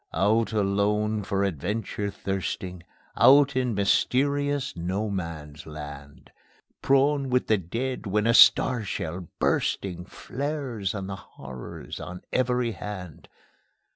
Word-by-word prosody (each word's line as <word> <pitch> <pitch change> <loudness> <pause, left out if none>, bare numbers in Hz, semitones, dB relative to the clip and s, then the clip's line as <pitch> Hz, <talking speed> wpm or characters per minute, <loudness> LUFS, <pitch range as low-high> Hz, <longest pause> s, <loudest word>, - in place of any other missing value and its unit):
Out 110 +4 +2
alone, 105 +1 +1
for 100 0 -1
adventure 100 +4 -2
thirsting, 95 -2 -4 0.3
Out 140 0 +6
in 125 -3 0
mysterious 140 +7 +1
No 95 +5 -2
Man's 80 -5 -6
Land; 75 -2 -10 0.5
Prone 140 0 +3
with 125 0 +2
the 110 -2 +2
dead 115 +7 -4
when 105 +2 +1
a 115 - +4
star 120 0 +6
shell, 90 -3 -4
bursting, 90 -3 0
Flares 130 -5 -4
on 100 -2 -4
the 95 0 -5
horrors 65 -9 -9
on 90 0 -8
every 125 -2 +1
hand. 95 -7 -8
105 Hz, 115 wpm, -26 LUFS, 90-125 Hz, 0.5 s, Out